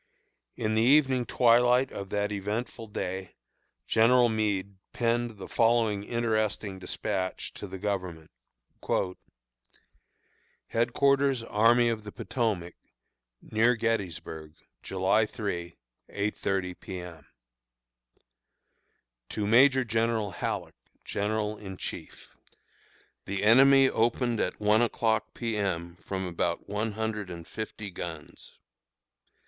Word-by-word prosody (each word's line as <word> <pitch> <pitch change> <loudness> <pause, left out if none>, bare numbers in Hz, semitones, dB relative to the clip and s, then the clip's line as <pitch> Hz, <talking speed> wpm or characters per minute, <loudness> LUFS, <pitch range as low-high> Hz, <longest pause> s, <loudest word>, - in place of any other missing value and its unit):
In 110 -1 -1
the 110 - +3
evening 130 -1 +4
twilight 125 +1 +4
of 100 -1 -6
that 105 +1 -1
eventful 105 +3 -4
day 95 -2 -5 0.5
General 120 +2 +4
Meade 100 -3 -1 0.2
penned 120 -1 0
the 95 - -8
following 115 -3 +2
interesting 110 -3 -1
despatch 95 0 -3
to - - -8
the 95 - -7
Government: 90 -5 -4 2.4
HEADQUARTERS 135 +2 +2
ARMY 115 +2 +4
OF 110 -2 -2
THE 105 - -8
POTOMAC, 100 -10 -2 0.7
Near 115 +3 +3
Gettysburg, 90 -9 -3 0.3
July 95 +3 +1
3, 85 -6 -5 0.3
8.30 95 -3 -2
P. 95 - -7
M. 85 -4 -10 2.0
To 105 - -2
Major 130 +5 +5
General 115 -2 0
Halleck, 85 - -4 0.3
General 105 +1 -2
in 95 -2 -8
Chief: - - -8 0.9
The 100 0 -3
enemy 135 +5 +7
opened 120 0 +1
at - - -1
one 105 +1 +4
o'clock 110 -2 0
P. 115 -2 -2
M., 85 -4 -2
from 95 -1 -3
about 85 -1 -2
one 105 +2 -2
hundred 110 -2 -3
and 85 -2 -8
fifty 110 -2 -6
guns. 80 -3 -8
110 Hz, 105 wpm, -28 LUFS, 95-115 Hz, 2.4 s, enemy